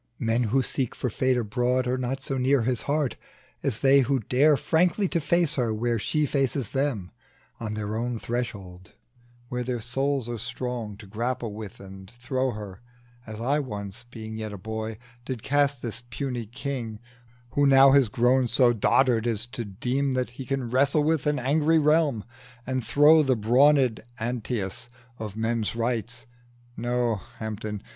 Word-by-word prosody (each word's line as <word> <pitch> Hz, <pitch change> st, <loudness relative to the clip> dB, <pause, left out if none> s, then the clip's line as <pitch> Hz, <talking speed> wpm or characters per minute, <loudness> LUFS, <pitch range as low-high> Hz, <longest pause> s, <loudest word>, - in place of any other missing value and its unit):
Men 115 Hz, +1 st, +1 dB
who 130 Hz, +5 st, +2 dB
seek 130 Hz, -1 st, -2 dB
for 125 Hz, -, -2 dB
Fate 130 Hz, +3 st, +1 dB
abroad 125 Hz, +3 st, 0 dB
Are 125 Hz, +1 st, 0 dB
not 130 Hz, +1 st, -3 dB
so 135 Hz, -1 st, -2 dB
near 130 Hz, 0 st, +3 dB
his 125 Hz, 0 st, 0 dB
heart 145 Hz, -3 st, 0 dB, 0.4 s
as 125 Hz, -6 st, -1 dB
they 140 Hz, 0 st, +6 dB
who 135 Hz, +1 st, +2 dB
dare 135 Hz, +6 st, +3 dB
Frankly 180 Hz, +7 st, +2 dB
to 170 Hz, -, 0 dB
face 170 Hz, +2 st, +2 dB
her 120 Hz, -3 st, +1 dB
where 115 Hz, +1 st, 0 dB
she 150 Hz, +7 st, 0 dB
faces 135 Hz, -3 st, -1 dB
them, 135 Hz, -10 st, -1 dB, 0.5 s
On 110 Hz, -2 st, -4 dB
their 105 Hz, 0 st, -3 dB
own 120 Hz, +1 st, -2 dB
threshold, 100 Hz, -7 st, -5 dB, 0.6 s
where 125 Hz, 0 st, -2 dB
their 125 Hz, -1 st, -2 dB
souls 135 Hz, +2 st, -1 dB
are 120 Hz, -1 st, -4 dB
strong 120 Hz, -3 st, -4 dB
To 105 Hz, -, -12 dB
grapple 115 Hz, +2 st, -3 dB
with 105 Hz, -2 st, -8 dB
and 95 Hz, -1 st, -11 dB
throw 130 Hz, +3 st, -2 dB
her; 105 Hz, -3 st, -7 dB, 0.5 s
as 110 Hz, 0 st, -7 dB
I 135 Hz, +6 st, +1 dB
once, 105 Hz, -4 st, -6 dB
Being 110 Hz, -2 st, -7 dB
yet 110 Hz, -1 st, -4 dB
a 100 Hz, -, -6 dB
boy, 110 Hz, +2 st, -5 dB, 0.3 s
did 125 Hz, -3 st, -5 dB
cast 140 Hz, -2 st, +1 dB
this 115 Hz, -1 st, -4 dB
puny 120 Hz, -2 st, -4 dB
king, 120 Hz, -2 st, -5 dB, 0.5 s
Who 145 Hz, 0 st, +3 dB
now 135 Hz, 0 st, +7 dB
has 135 Hz, -5 st, +5 dB
grown 125 Hz, +3 st, +3 dB
so 120 Hz, +1 st, +4 dB
dotard 120 Hz, +1 st, +3 dB
as 115 Hz, -1 st, 0 dB
to 120 Hz, -1 st, -5 dB
deem 125 Hz, +7 st, -1 dB
That 125 Hz, -1 st, -1 dB
he 125 Hz, +1 st, -8 dB
can 135 Hz, -3 st, -2 dB
wrestle 140 Hz, +4 st, +3 dB
with 155 Hz, -2 st, +1 dB
an 150 Hz, 0 st, +2 dB
angry 150 Hz, +5 st, +2 dB
realm, 150 Hz, -7 st, +3 dB, 0.4 s
And 130 Hz, -1 st, -2 dB
throw 150 Hz, +5 st, +6 dB
the 135 Hz, -3 st, +2 dB
brawned 125 Hz, +2 st, +4 dB, 0.2 s
Antæus 120 Hz, -2 st, -3 dB, 0.3 s
of 110 Hz, -2 st, -6 dB
men's 115 Hz, 0 st, -1 dB
rights. 115 Hz, -1 st, -2 dB, 0.5 s
No, 120 Hz, -1 st, 0 dB, 0.2 s
Hampden! 105 Hz, -1 st, -5 dB
125 Hz, 165 wpm, -26 LUFS, 110-135 Hz, 0.6 s, now